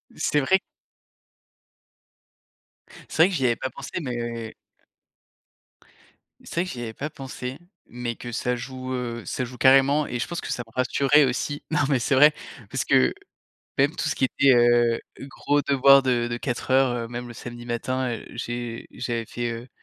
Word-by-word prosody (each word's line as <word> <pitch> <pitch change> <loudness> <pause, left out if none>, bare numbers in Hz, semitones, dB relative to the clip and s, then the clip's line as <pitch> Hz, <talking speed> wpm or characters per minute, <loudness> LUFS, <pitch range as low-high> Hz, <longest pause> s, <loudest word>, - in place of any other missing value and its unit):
C'est 150 - +1
vrai 190 +8 +3 2.5
c'est 160 - +5
vrai 185 - +5
que 185 - -3
j'y 130 -3 0
avais 120 - +2
pas 130 - -4
pensé, - - -9
mais 120 -3 -4 1.9
c'est - - -10
vrai - - -1
que - - -6
j'y 120 - -6
avais 115 -1 -5
pas 150 +6 -5
pensé, 135 0 -7 0.3
mais 120 -1 -5
que 120 - -8
ça 125 +2 -1
joue, 130 +1 -6
heu, 120 -3 -4
ça 130 - -3
joue 125 +1 -10
carrément 135 +3 +5
et 120 - -4
je - - -2
pense 175 0 -4
que - - -5
ça 120 - -2
me 115 - -21
rassurait 140 +3 +4
aussi. 140 +3 -2
Non 155 - +2
mais 135 -3 +3
c'est 140 +2 +1
vrai 150 +3 +7 0.4
parce - - -2
que, 65 - +4 0.6
même 145 +5 +3
tout 155 - -1
ce - - -1
qui 130 - +2
était, 135 +1 +4
heu, 120 -1 +4 0.3
gros 145 +1 0
devoir 140 0 +6
de 120 -2 +1
de 120 - -2
4 120 0 -3
heures, 130 -1 +4
heu, - - -8
même 120 +1 -6
le - - -8
samedi 120 0 -9
matin, 130 +2 -2
heu, 115 - -7
j'ai 120 -1 -5
j'avais 115 -1 -3
fait, 120 +2 -3
heu, 115 +2 -7
125 Hz, 185 wpm, -25 LUFS, 120-135 Hz, 2.5 s, vrai